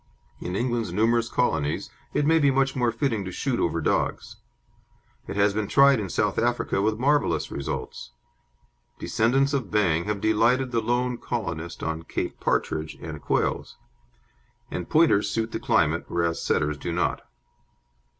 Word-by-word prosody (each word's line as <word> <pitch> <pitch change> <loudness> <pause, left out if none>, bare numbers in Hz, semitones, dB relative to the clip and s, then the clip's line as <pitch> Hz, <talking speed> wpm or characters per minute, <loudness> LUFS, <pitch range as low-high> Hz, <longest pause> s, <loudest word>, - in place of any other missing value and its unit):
In 90 - -4
England's 120 -3 -1
numerous 115 +4 +2
colonies 75 -13 -1 0.2
it 145 - 0
may 160 +2 +4
be 140 -2 +4
much 135 0 +1
more 120 -2 +1
fitting 115 -3 -1
to 95 - -6
shoot 125 +4 -2
over 85 -1 0
dogs. 80 - -1 0.9
It - - -5
has 100 0 +3
been 105 0 -1
tried 140 0 +5
in 100 -3 -4
South - - 0
Africa 95 - 0
with 110 +1 +1
marvellous 145 +4 +1
results. 70 -2 -5 0.9
Descendants 130 +5 +1
of 130 -8 -1
Bang 85 -6 +1
have 105 -1 -2
delighted 115 +5 +2
the 115 -1 +1
lone 120 +2 0
colonist 85 -8 -4
on 80 0 -2
Cape - - -4
partridge 80 0 -1
and - - -7
quails, - - -1 0.9
and 90 - -5
Pointers 155 -11 +4
suit 115 +2 -2
the - - -3
climate, - - +1
whereas 85 -1 -1
Setters 75 -1 0
do 85 - -4
not. 85 +1 0
110 Hz, 150 wpm, -25 LUFS, 90-125 Hz, 0.9 s, tried